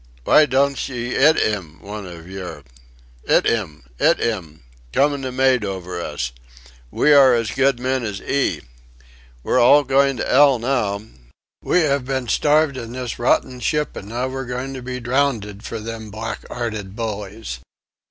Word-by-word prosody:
Vy 155 - +6
donch 140 +1 +1
'ee 120 -1 -4
'it 155 +4 +5
'im 90 -7 -1
one 105 -1 -7
ov 85 -1 -10
yer? 95 -1 -7 0.6
'It - - +3
'im. 80 - -1 0.2
'It - - +4
'im! 85 - -3 0.3
Comin' 140 - +2
the 130 -1 -4
mate 130 -2 +2
over 90 -3 -4
us. 75 -7 -4 0.6
We 150 - +3
are 135 -3 +7
as 115 -2 -1
good 135 -2 +2
men 130 0 -1
as 105 -3 -4
'ee! 140 -1 -1 0.8
We're - - +2
all 145 +5 +6
goin' 135 0 +2
to - - -2
'ell 140 -1 +5
now. 110 -5 -1 0.6
We 180 -2 +2
'ave 140 -2 +1
been 130 -2 -2
starved 150 +3 +2
in 115 -1 -7
this 125 -2 -5
rotten 125 +1 +1
ship, 150 +4 -1
an' 100 - -8
now 120 +4 -2
we're 135 0 -5
goin' 125 +2 -4
to 130 - -7
be 125 0 -5
drowned 120 -5 -1
for 115 - -5
them 110 0 -7
black 110 +2 -6
'earted 110 -5 -5
bullies! 105 - -5
120 Hz, 165 wpm, -21 LUFS, 105-135 Hz, 0.8 s, are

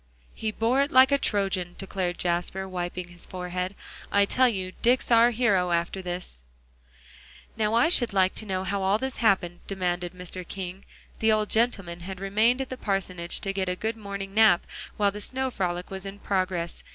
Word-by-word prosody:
"He 220 - -3
bore 230 +5 +2
it 280 - +1
like 260 0 +6
a 280 - +4
Trojan," 195 -5 0
declared 185 -2 -3
Jasper, 175 +2 -1
wiping 180 -1 -4
his 175 0 -5
forehead. 180 +1 -4 0.4
"I 200 0 +5
tell 255 +5 +4
you, 190 -4 -3
Dick's 245 +1 +2
our 230 +1 +7
hero, 210 -7 +2
after 170 +2 0
this." 175 - -6 1.1
"Now 220 0 +1
I 235 +8 +5
should 245 -9 +3
like 190 -1 +3
to 220 - -4
know 185 -1 -1
how 195 +1 -1
all 190 +2 +3
this 265 +3 -4
happened," 185 -6 +2
demanded 180 -2 -2
Mr. 180 0 -7
King. 190 0 -6 0.3
The 220 0 +3
old 215 -1 +1
gentleman 195 -7 +1
had 185 +2 -7
remained 215 +6 +2
at 265 - -4
the 255 - -5
parsonage 185 -5 -2
to 195 - -2
get 190 -1 -1
a 180 - -1
good 220 +4 -2
morning 200 -2 -6
nap 215 -5 +5 0.3
while 205 -1 +3
the 210 +1 -7
snow 260 +3 -2
frolic 180 -4 -2
was 190 -1 -5
in 195 +1 -7
progress. 185 -4 -2
195 Hz, 190 wpm, -27 LUFS, 180-220 Hz, 1.1 s, our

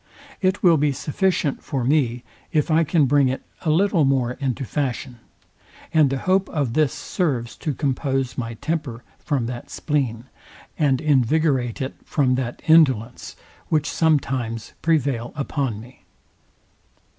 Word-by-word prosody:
It 190 0 +1
will 170 -3 +6
be 145 0 +2
sufficient 155 0 -1
for 135 -4 -2
me, 125 -3 +1 0.3
if 155 -1 +1
I 160 +1 +4
can 155 -1 +3
bring 140 0 +3
it 130 +1 -2 0.2
a 165 - -1
little 175 +1 +3
more 135 -3 +2
into 130 0 -3
fashion; 125 -2 -3 0.7
and 155 -3 +5
the 135 - -1
hope 190 +6 +1
of 140 -7 -1
this 155 -1 +2
serves 130 -10 -2
to 150 -5 -3
compose 135 -2 -1
my 115 -2 -4
temper 145 -4 -4 0.2
from 140 -7 -1
that 120 0 -6
spleen, 130 -7 -2 0.5
and 140 -4 +2
invigorate 135 -3 +1
it 130 - -4
from 135 -4 +1
that 125 -2 -3
indolence, 130 -8 +3 0.3
which 155 -1 +1
sometimes 130 -8 0
prevail 140 -7 0
upon 140 -6 -2
me. 120 +4 -14
140 Hz, 140 wpm, -22 LUFS, 125-155 Hz, 0.7 s, will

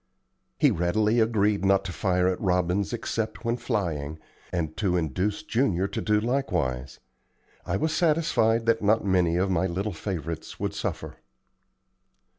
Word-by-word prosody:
He - - +4
readily 105 +7 +1
agreed 105 -3 +2
not 95 0 +3
to 90 - -4
fire 90 -1 +1
at 95 - -1
robins 90 +1 +1
except 115 -1 -3
when 115 0 +1
flying, 80 -10 -2 0.3
and 80 -3 -2
to 90 -4 +1
induce 90 - -1
Junior 105 - +1
to 100 - -3
do 105 -1 +2
likewise. 90 - -1 0.7
I 90 - 0
was 160 +9 0
satisfied 150 -9 +2
that 115 0 +2
not 105 +1 +2
many 90 -3 +2
of 95 +2 +1
my 90 +1 +1
little 95 +3 -2
favorites 85 -3 -5
would - - -2
suffer. - - -4
95 Hz, 145 wpm, -26 LUFS, 85-110 Hz, 0.7 s, He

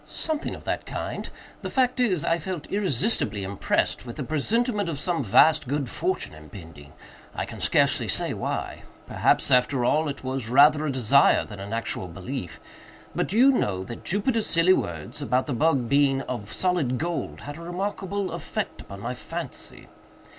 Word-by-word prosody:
"Something 315 -1 -3
of - - -12
that - - -3
kind. - - -5 0.3
The - - -4
fact 255 -1 +1
is, 190 -11 +2
I 165 +1 +2
felt 170 -1 -5
irresistibly 150 - +1
impressed 100 +1 -1
with 120 -2 -8
a 145 - -3
presentiment 205 - 0
of 150 -4 -4
some 170 -2 0
vast 130 +8 +5
good 140 0 -1
fortune 165 - -2
impending. 75 -1 -12 0.4
I - - -2
can - - -9
scarcely - - +2
say - - +1
why. - - -4 0.2
Perhaps, - - +2
after 125 0 +3
all, 155 +4 +2
it 140 - -6
was 130 -3 -3
rather 150 +4 +5
a - - 0
desire 130 +2 +4
than 105 -2 -10
an 100 +2 -7
actual 115 -4 -3
belief;—but 90 +2 -7
do 200 - -2
you 265 +3 +7
know 100 - 0
that 115 +4 -8
Jupiter's 215 +4 +1
silly 170 +3 +5
words, 80 - -3
about 130 +1 +1
the 145 - -3
bug 135 -2 +2
being 140 0 +3
of 105 -4 -6
solid 165 -6 0
gold, 170 +4 -3
had 145 +1 -7
a - - -10
remarkable 195 +2 -3
effect - - -4
upon 100 0 -10
my 120 +3 -3
fancy? - - -7
140 Hz, 170 wpm, -25 LUFS, 120-180 Hz, 0.4 s, you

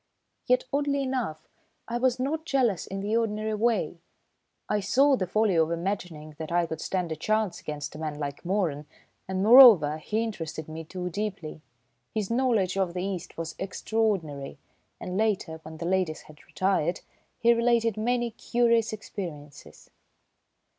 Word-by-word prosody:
Yet, - - +3
oddly 280 -1 +1
enough, 245 -13 -3 0.4
I 240 0 -2
was 255 0 +1
not 300 +5 -1
jealous 250 - +1
in 195 0 -5
the 210 +3 -1
ordinary 215 -1 0
way. 215 -6 0 0.7
I 210 - +1
saw 275 +7 +4
the 185 -7 -2
folly 215 -2 +2
of 160 -1 +3
imagining 170 -3 -4
that 160 +1 -5
I 175 0 +2
could 160 -1 -6
stand 180 -3 -2
a - - -1
chance 215 +4 -1
against 150 -1 -5
a 150 - -9
man 155 -2 -4
like 140 -1 -5
Moeran, 170 -6 -1 0.4
and, 190 0 -1
moreover, 210 - +8
he 220 +8 -1
interested 165 -8 -5
me 160 +1 -7
too 180 +2 -5
deeply. 190 -6 -4 0.5
His 215 -1 -1
knowledge 230 -7 +1
of 185 -2 0
the 180 - -2
East 190 -3 -5
was 165 0 -4
extraordinary, 190 -9 -2 0.4
and 180 +1 -4
later, 200 -7 0
when 160 0 -10
the 170 - -5
ladies 180 -3 0
had 150 -1 -17
retired, 185 -3 0 0.4
he 235 +1 +4
related 230 -2 +2
many 240 +2 0
curious 230 -1 +1
experiences. 155 -9 -9
195 Hz, 155 wpm, -27 LUFS, 160-230 Hz, 0.7 s, moreover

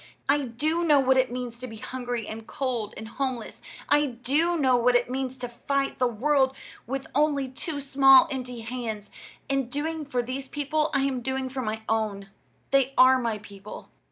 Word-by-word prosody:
I 290 -1 +2
do 310 +9 0
know 300 -4 +5
what 265 -1 +4
it 260 0 +3
means 245 -1 -5
to 255 - -6
be 225 - -9
hungry 245 0 -4
and 220 0 -7
cold 240 -6 -3
and 220 - -6
homeless. 255 -1 -4 0.3
I 295 0 +4
do 280 +8 0
know 260 -4 +3
what 245 +1 +3
it 245 0 +2
means 260 0 -3
to 250 -1 -4
fight 275 +4 -2
the 250 - +3
world 265 +3 +2 0.3
with 270 +2 -3
only 285 -1 +2
two 285 +3 -5
small 270 +3 +6
empty 250 -3 -5
hands. 225 -3 -5 0.4
In 270 -3 0
doing 310 +3 -3
for 250 -3 -1
these 260 +2 -5
people 300 +2 0
I 275 - +3
am 270 -2 0
doing 265 +1 -2
for 260 0 -4
my 220 -1 -3
own. 205 -3 -1 0.4
They 275 0 +3
are 260 0 +7
my 230 -3 -1
people." 205 -1 -11
260 Hz, 185 wpm, -26 LUFS, 235-275 Hz, 0.4 s, are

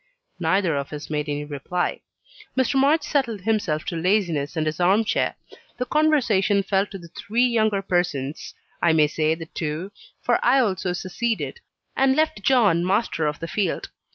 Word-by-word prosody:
Neither 175 -1 +1
of 140 0 -4
us 150 +1 -7
made 150 0 -2
any 145 0 -2
reply. 150 +5 -3 0.6
Mr. 260 0 +2
March 295 +3 +3
settled 260 -9 -1
himself 185 -7 0
to 175 - -3
laziness 170 -4 0
and 155 - +1
his 155 +1 -2
arm 190 +5 +4
chair; - - 0 0.4
the 250 - -2
conversation 235 -11 +2
fell 195 +1 +1
to 195 - -8
the 170 -2 -13
three 225 +8 0
younger 220 -5 +1
persons 160 -6 -2 0.3
I 170 - +4
may 155 -1 +5
say 155 +1 0
the 165 0 -8
two 160 +4 -4 0.3
for 240 - +1
I 250 +3 +5
also 190 -7 +1
seceded, 225 - -3 0.4
and 265 0 +3
left 315 -6 +1
John 205 -8 +3
master 185 -4 0
of 150 - -2
the 165 - -5
field. 190 +1 -2
190 Hz, 170 wpm, -23 LUFS, 160-230 Hz, 0.6 s, may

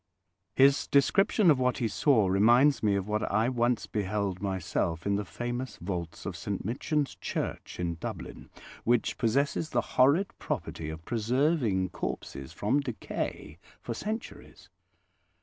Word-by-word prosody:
His 135 +1 +5
description 180 +6 +4
of 140 - +2
what 125 0 +1
he 120 - 0
saw 110 0 +3
reminds 120 +9 +5
me 105 -2 +2
of 100 0 -2
what 105 +1 0
I 110 +4 +2
once 120 -1 +1
beheld 100 -2 -2
myself 90 -4 -2
in 100 0 +2
the 105 - -1
famous 120 +7 -5
vaults 85 -2 -5
of - - -4
St - - -4
Michan's 140 +6 -1
Church - - -5
in 85 -2 -2
Dublin, - - -7 0.3
which 120 -1 +1
possess 135 +5 +2 0.2
the 120 - +1
horrid 140 - +3
property 80 -1 -4
of 80 +1 -8
preserving 120 - +1
corpses 70 -6 -5
from 125 +8 +1
decay 115 - -5 0.2
for 120 - -5
centuries. 215 - -6
115 Hz, 140 wpm, -29 LUFS, 95-135 Hz, 0.3 s, His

